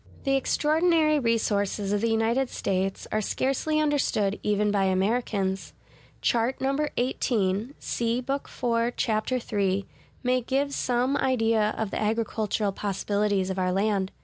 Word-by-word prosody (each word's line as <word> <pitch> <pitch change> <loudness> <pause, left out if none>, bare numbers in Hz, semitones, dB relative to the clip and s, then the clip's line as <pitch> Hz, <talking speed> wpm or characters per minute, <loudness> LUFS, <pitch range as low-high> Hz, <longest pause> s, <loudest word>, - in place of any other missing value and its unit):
The 275 -1 +2
extraordinary 310 +2 +2
resources 205 -4 0
of 205 - +1
the 230 - +1
United 230 +4 +1
States 190 0 -2
are 215 - +1
scarcely 275 +8 0
understood 275 -9 +1
even 210 0 +1
by 200 -1 +2
Americans. 195 0 0 0.5
Chart 235 +2 +1
No. 270 +1 0
XVIII 245 -5 -1
(see 235 +1 -1
Book 275 +2 -3
IV, 235 0 0
Chap. 215 +1 0
III) 200 -6 0 0.4
may 255 0 +2
give 275 +3 -1
some 250 +2 +1
idea 225 -5 +2
of 220 -3 -2
the - - -2
agricultural 215 -1 0
possibilities 200 0 -1
of 190 - -3
our 185 0 +1
land. 195 0 0
225 Hz, 135 wpm, -26 LUFS, 200-255 Hz, 0.5 s, The